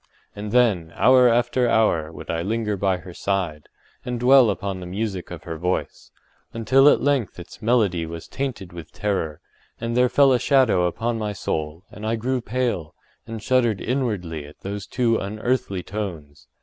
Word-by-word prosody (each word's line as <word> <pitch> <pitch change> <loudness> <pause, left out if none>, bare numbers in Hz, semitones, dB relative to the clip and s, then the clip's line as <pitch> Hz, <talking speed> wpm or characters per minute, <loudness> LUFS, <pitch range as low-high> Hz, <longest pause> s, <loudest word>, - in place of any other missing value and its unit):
And 105 0 -6
then, 105 -9 +2
hour 125 0 +6
after 120 +1 +2
hour, 85 -9 +2
would - - -7
I 85 - -1
linger 105 +2 -1
by 95 -1 +1
her 90 +1 -11
side, 90 -6 -2 0.3
and 125 -1 -3
dwell 125 -1 +6
upon 100 -2 -3
the 90 - -7
music 95 -1 -4
of 85 - -8
her 80 -3 -6
voice, 90 +2 -3 0.4
until 130 +5 +5
at - - +3
length 140 -8 0
its 90 +5 -11
melody 105 -8 +1
was 85 0 -8
tainted 120 -10 -5
with 85 -3 -9
terror, 90 -7 -2 0.4
and 115 0 -3
there 125 0 +4
fell 140 0 +5
a 125 - +2
shadow 120 -10 +3
upon 115 +6 -2
my 105 -1 -2
soul, 80 -2 -4
and 105 - -11
I 110 +1 0
grew 125 +3 -1
pale, 115 -9 -2 0.3
and 110 -1 -7
shuddered 120 -6 +2
inwardly 105 - -2
at 75 - -16
those 100 0 -5
too 115 -3 +1
unearthly 105 -2 -2
tones. 80 - -6
105 Hz, 175 wpm, -23 LUFS, 90-120 Hz, 0.4 s, hour